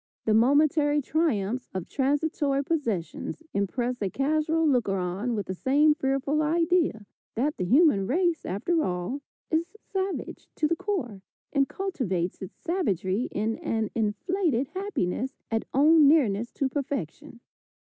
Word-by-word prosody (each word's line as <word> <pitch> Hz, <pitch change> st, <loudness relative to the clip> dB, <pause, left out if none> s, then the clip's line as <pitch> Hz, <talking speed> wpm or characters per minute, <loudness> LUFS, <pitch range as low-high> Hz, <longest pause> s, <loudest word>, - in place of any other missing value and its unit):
The 220 Hz, -, +3 dB
momentary 290 Hz, +5 st, +4 dB
triumphs 255 Hz, -, -1 dB
of 185 Hz, -2 st, -3 dB
transitory 280 Hz, 0 st, 0 dB
possessions 270 Hz, -, -3 dB
impress 240 Hz, +5 st, -1 dB
a 200 Hz, -, 0 dB
casual 310 Hz, -, +1 dB
looker 240 Hz, -8 st, +2 dB
on 190 Hz, +7 st, -2 dB
with 205 Hz, -, -2 dB
the 185 Hz, -, -4 dB
same 285 Hz, +9 st, +3 dB
fearful 275 Hz, +1 st, 0 dB
idea 330 Hz, -, +1 dB, 0.3 s
that 285 Hz, +6 st, 0 dB
the 180 Hz, -, -1 dB
human 235 Hz, -, +4 dB
race, 340 Hz, -, +1 dB
after 315 Hz, -, 0 dB
all, 180 Hz, +10 st, -3 dB, 0.3 s
is 335 Hz, +5 st, -1 dB
savage 385 Hz, -1 st, -4 dB
to 305 Hz, -, +1 dB
the 335 Hz, -, +1 dB
core, 265 Hz, -, -3 dB, 0.3 s
and 275 Hz, -2 st, +2 dB
cultivates 220 Hz, -, -2 dB
its 190 Hz, -, -8 dB
savagery 225 Hz, -, -1 dB
in 220 Hz, +2 st, -2 dB
an 220 Hz, -1 st, -2 dB
inflated 255 Hz, -, 0 dB
happiness 265 Hz, -, -2 dB, 0.2 s
at 225 Hz, 0 st, 0 dB
own 300 Hz, +2 st, +6 dB
nearness 240 Hz, -7 st, +3 dB
to 275 Hz, -, 0 dB
perfection. 270 Hz, -, -4 dB
275 Hz, 135 wpm, -27 LUFS, 215-315 Hz, 0.3 s, own